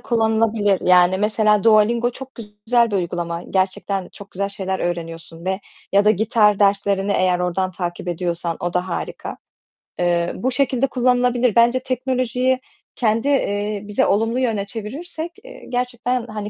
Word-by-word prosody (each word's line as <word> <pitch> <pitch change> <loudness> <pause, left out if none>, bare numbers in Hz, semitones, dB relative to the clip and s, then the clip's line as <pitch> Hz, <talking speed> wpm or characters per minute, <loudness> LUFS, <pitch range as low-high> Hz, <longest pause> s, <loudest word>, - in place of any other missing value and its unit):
kullanılabilir. 220 -3 +1
Yani 180 +1 +4
mesela; 210 0 +2
Duolingo 230 +2 +4
çok 265 +1 -9
güzel 225 +2 0
bir 200 - 0
uygulama. 170 -1 -3
Gerçekten 190 0 -1
çok 200 0 -12
güzel 200 +2 -2
şeyler 190 -1 -3
öğreniyorsun 165 -1 -5
ve 190 +1 -1 0.3
ya 200 +1 +4
da 210 - +6
gitar 210 0 +3
derslerini 200 0 +2
eğer 185 -2 +2
oradan 180 +1 -1
takip 175 0 -5
ediyorsan 170 -1 -2
o 175 0 -2
da 180 +1 -1
harika. 170 - -5 0.6
Eee, 175 -1 +1
bu 255 +7 -1
şekilde 270 0 +1
kullanılabilir. 250 -2 +2
Bence 235 +2 +4
teknolojiyi 255 0 0 0.4
kendi, 225 +1 +1
eee, 210 -7 0
bize 210 - +1
olumlu 225 +4 +1
yöne 225 -6 0
çevirirsek, 300 - -6
eee, - - -12
gerçekten 245 0 -2
hani 210 -2 -5
210 Hz, 145 wpm, -21 LUFS, 185-240 Hz, 0.6 s, da